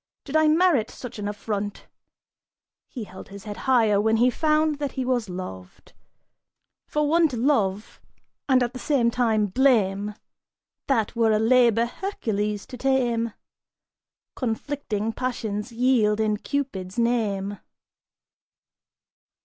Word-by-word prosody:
Did 285 - -6
I 315 0 +5
merit 310 -7 +3
such 245 -4 -9
an 205 - -3
affront'?" 205 0 -4 1.0
He 245 - -7
held 190 -2 -11
his 200 0 -10
head 210 -1 -6
higher 220 -5 +4
when 220 +1 +2
he 245 +2 +4
found 305 +1 +1
that 285 -2 -3
he 260 - -2
was 245 -5 0
loved. 95 - -8 0.9
For 300 0 0
one 330 +2 +4
to 255 -5 -5
love, 215 -6 0 0.5
and 255 -1 +5
at 240 +1 -3
the 255 - -7
same 245 -4 +2
time, 225 -3 +2
blame, 210 -3 +2 0.7
That 235 -4 +1
were 230 -1 +3
a 215 - +3
labor 235 0 +4
Hercules 215 - -3
to 250 - -9
tame! 240 -4 +1 1.0
Conflicting 225 -3 -3
passions 225 -3 -3
yield 230 -3 +2
in 215 -1 +1
Cupid's 210 -8 -4
name. 205 -4 0
230 Hz, 125 wpm, -24 LUFS, 210-260 Hz, 1.0 s, I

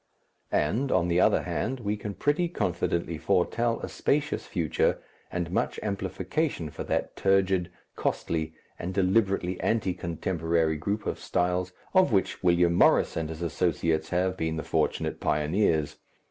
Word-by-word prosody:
And, 115 - +1
on 90 -1 +2
the 85 +1 +3
other - - +4
hand, 130 0 -2
we 105 -1 -1
can 105 -1 -6
pretty 165 +4 +1
confidently 85 - -1
foretell 115 +8 +1
a - - -4
spacious 145 +1 -1
future 85 -4 0 0.3
and 85 -1 -3
much - - -1
amplification 95 - -2
for - - -6
that - - -1
turgid, 95 -2 +2 0.3
costly, 80 -1 -2 0.2
and 90 +2 -4
deliberately 95 -2 +1
anti 110 -5 +1
contemporary 80 -2 -1
group 100 +7 -2
of - - -2
styles 90 +1 0 0.2
of 185 -5 +5
which 95 -3 +1
William 85 -1 +4
Morris - - +4
and 80 -1 -2
his 80 +1 -5
associates 80 -2 0
have 95 +1 +1
been 80 -3 -2
the 80 - -3
fortunate - - -1
pioneers. 80 +1 +1
90 Hz, 145 wpm, -27 LUFS, 80-100 Hz, 0.3 s, of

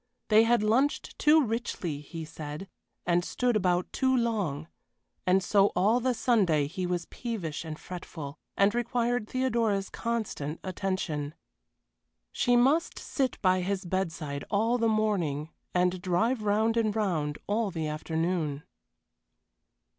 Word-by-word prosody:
They 220 +1 +6
had 235 -2 +3
lunched 255 +7 +1
too 305 +1 +6
richly, 215 - -3
he 160 +2 -7
said, 155 +3 -7 0.4
and 175 0 +2
stood 245 +5 0
about 180 -3 +1
too 260 -1 +2
long, 200 - -1 0.6
and 185 +1 +4
so 200 0 +4
all 210 +7 +3
the 250 0 0
Sunday 195 - +3
he 180 +5 -3
was 175 -1 -1
peevish 195 -12 -4
and 155 -2 -6
fretful, 155 -5 -8 0.2
and 200 +1 +4
required 240 -1 0
Theodora's 230 -6 0
constant 215 -10 -3
attention. 180 -6 -2 1.0
She 245 -1 +2
must 275 +8 +3
sit 265 -3 -2
by 185 -1 +4
his 190 +1 -2
bedside 165 -6 -2
all 225 +4 +2
the 230 -1 +3
morning, 175 -9 0 0.2
and 180 0 +1
drive 215 +7 +1
round 215 +2 +2
and 220 -2 +1
round 160 -9 0
all 215 +1 0
the 165 -4 -3
afternoon. 160 -1 -2
195 Hz, 130 wpm, -29 LUFS, 165-230 Hz, 1.0 s, They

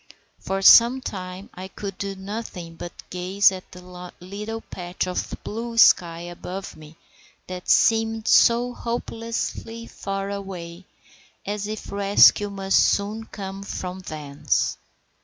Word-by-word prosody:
For 195 0 -3
some 235 +5 +8
time 185 -4 -7
I 185 +1 -7
could 195 0 -7
do 200 -1 -3
nothing 190 -4 -7
but 175 +1 -10
gaze 185 +3 +3
at 185 -1 -9
the 180 0 -10
little 210 +5 -6
patch 175 -3 -5
of 180 0 -3
blue 230 +2 -5
sky 170 -6 +5
above 175 +2 -7
me 155 +1 -14 0.5
that 180 -1 -7
seemed 225 -1 +3
so 240 +1 +5
hopelessly 230 -1 -4
far 195 -2 -4
away, 185 -3 -7 0.6
as 205 0 -3
if 215 0 -6
rescue 200 +1 +5
must 195 -1 +1
soon 210 +2 +1
come 195 -2 -7
from 185 -2 -5
thence. 150 -5 -2
195 Hz, 125 wpm, -24 LUFS, 180-215 Hz, 0.6 s, some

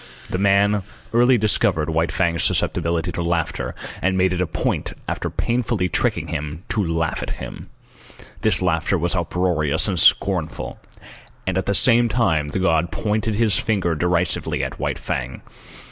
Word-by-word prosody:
The 90 - -1
man 100 +1 +3 0.3
early 120 +2 +5
discovered 85 -7 +1
White 80 +1 0
Fang's 85 -3 0
susceptibility 85 +1 0
to 85 - -3
laughter, 85 -1 -2 0.3
and 95 +1 +1
made 95 0 +2
it 90 - -1
a 90 - 0
point 80 - -2
after - - -3
painfully 115 -6 -1
tricking - - -1
him, 75 +4 -5
to 105 - 0
laugh 80 -2 -1
at - - -4
him. - - -9 0.7
This - - +3
laughter 85 +2 +1
was 85 +2 -1
uproarious 85 -4 +1
and - - 0
scornful, - - +2 0.7
and 95 - -1
at 95 - -1
the 100 - +1
same 120 +1 +5
time 80 -12 +1
the 75 - -4
god 85 -2 +1
pointed 105 +5 -1
his 110 -2 +2
finger 100 -6 0
derisively 90 +2 +1
at - - -5
White - - -2
Fang. 65 0 -4
90 Hz, 160 wpm, -21 LUFS, 80-100 Hz, 0.7 s, early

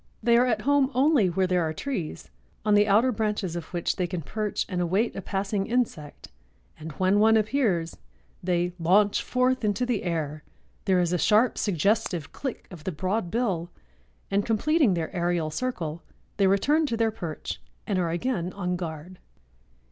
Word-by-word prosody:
They 235 +1 +4
are 245 +2 +4
at 220 -3 0
home 285 -1 +3
only 265 - +4
where 185 +2 +1
there 180 -1 +1
are 160 -1 -1
trees, 175 - -5 0.3
on 210 - +3
the 205 0 +5
outer 220 +6 +4
branches 210 -5 -2
of 170 - -4
which 175 -2 -2
they 180 -2 0
can 175 -2 -4
perch 210 +6 -2
and 180 -2 -2
await 190 +7 0
a 195 - -4
passing 195 +1 -2
insect, 220 -12 -2 0.5
and 155 +1 -7
when 190 +4 +2
one 220 +1 +5
appears 210 - 0 0.5
they 175 -1 0
"launch 200 +5 +3
forth 255 0 +1
into 215 +4 +1
the 245 -4 -1
air; 155 -3 -3 0.4
there 185 -2 +3
is 175 0 +1
a 180 - +1
sharp, 220 +7 +4
suggestive 185 -3 0
click 265 -4 -5
of 170 -5 -10
the 185 - -2
broad 185 +4 -2
bill 190 -7 -1 0.6
and, 200 +1 +2
completing 235 - +2
their 165 +2 -4
aerial 170 -3 0
circle, 170 -8 -3 0.4
they 200 -2 +4
return 290 +11 +3
to 230 - -2
their 225 -1 +2
perch 170 -8 -6 0.2
and 195 -3 0
are 170 -2 0
again 175 0 -2
en 180 -2 -1
garde." 170 +1 -7
195 Hz, 175 wpm, -26 LUFS, 175-225 Hz, 0.6 s, the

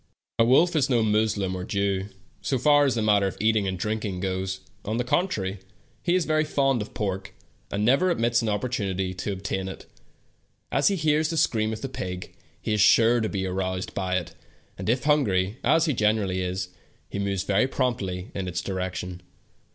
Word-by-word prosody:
The 115 - +6
wolf 160 +8 +4
is 140 -4 +2
no 120 -3 +3
Moslem 105 -3 +1
or 90 - -4
Hebrew, 100 0 -1 0.3
so 135 - 0
far 145 +2 +5
as 130 -4 +1
the 115 - 0
matter 105 -2 +4
of 95 - -5
eating 110 -2 +2
and 95 -1 -2
drinking 105 -1 -2
goes; 95 0 -2 0.2
on 110 +2 -2
the 125 - +1
con 175 +9 +2
trary, 95 - -3 0.4
he 175 0 +1
is 180 -3 +2
very 155 0 +2
fond 135 -5 +1
of 105 - -8
pork, 95 -2 -3 0.4
and 105 +1 0
never 140 +10 +4
omits 120 -7 +2
an 115 - -1
opportunity 100 -4 -1
to 95 +3 -4
obtain 95 0 -3
it. 95 - -8 0.9
As 135 +2 +3
he 200 - +3
hears 155 -2 +2
the 165 - -2
scream 110 -8 +2
of 110 - -5
the 135 - -2
pig, 90 -7 -6 0.3
he 110 - -2
is 105 - +2
sure 115 +3 +5
to 110 - -1
be 95 -2 -2
aroused 95 0 -2
by 95 -1 -1
it, 85 -2 -5 0.4
and - - -4
if 125 +2 +1
hungry, 105 -9 +2
as 165 0 +4
he 155 - +1
generally 105 -4 +1
is, 90 0 -3 0.4
he 100 - -5
moves 100 -2 -1
very 100 +5 +2
prompt!}^ 105 -9 -2
in 95 -2 -3
its 90 -1 -2
direction. 90 -2 -4
105 Hz, 200 wpm, -26 LUFS, 95-125 Hz, 0.9 s, The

